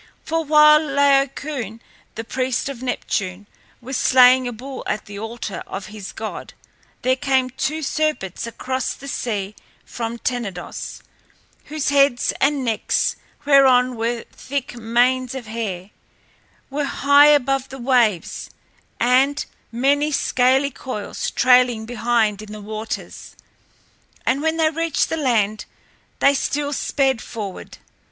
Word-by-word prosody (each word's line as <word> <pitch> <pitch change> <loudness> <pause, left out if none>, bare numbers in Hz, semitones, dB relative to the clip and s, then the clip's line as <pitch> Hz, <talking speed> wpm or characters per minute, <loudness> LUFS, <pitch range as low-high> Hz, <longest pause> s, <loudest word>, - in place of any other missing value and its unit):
For 325 0 -1
while 300 0 +7
Laocoön, 275 -5 0 0.4
the 225 - -4
priest 255 +2 -2
of 260 -3 -7
Neptune, 200 -6 -3 0.4
was 260 +2 -4
slaying 255 0 +5
a - - -3
bull 260 +4 -8
at 210 - -2
the 200 0 -8
altar 225 -1 -5
of 195 0 -6
his 205 -3 -7
god, 220 -1 -7 0.5
there 255 +1 +3
came 265 -2 +1
two 305 +5 -2
serpents 270 - -2
across 260 +2 -3
the 275 - -11
sea 210 -6 -3 0.3
from 230 0 -5
Tenedos, 225 -8 -5 0.6
whose 305 -2 -2
heads 275 -3 +3
and 275 -1 +2
necks, 225 -2 0 0.3
whereon 260 -3 +5
were 230 +1 -2
thick 275 -2 -5
manes 245 +3 +1
of 260 -3 -6
hair, 210 -4 -5 0.8
were 290 +1 -1
high 285 +1 +5
above 270 -2 +2
the 270 - -8
waves, 240 -8 +1 0.5
and 270 +5 +3 0.3
many 285 +5 +1
scaly 265 0 +2
coils 230 -5 -5
trailed 250 -3 +3
behind 225 -3 0
in 215 -1 -10
the 215 - -7
waters. 215 +1 -6 0.9
And 270 +2 +1
when 320 +1 0
they 315 -1 +3
reached 330 -1 0
the 325 - -2
land 215 -7 0 0.5
they 280 - +4
still 285 +1 -1
sped 265 -4 0
forward. 205 -5 -7
255 Hz, 130 wpm, -21 LUFS, 225-280 Hz, 0.9 s, while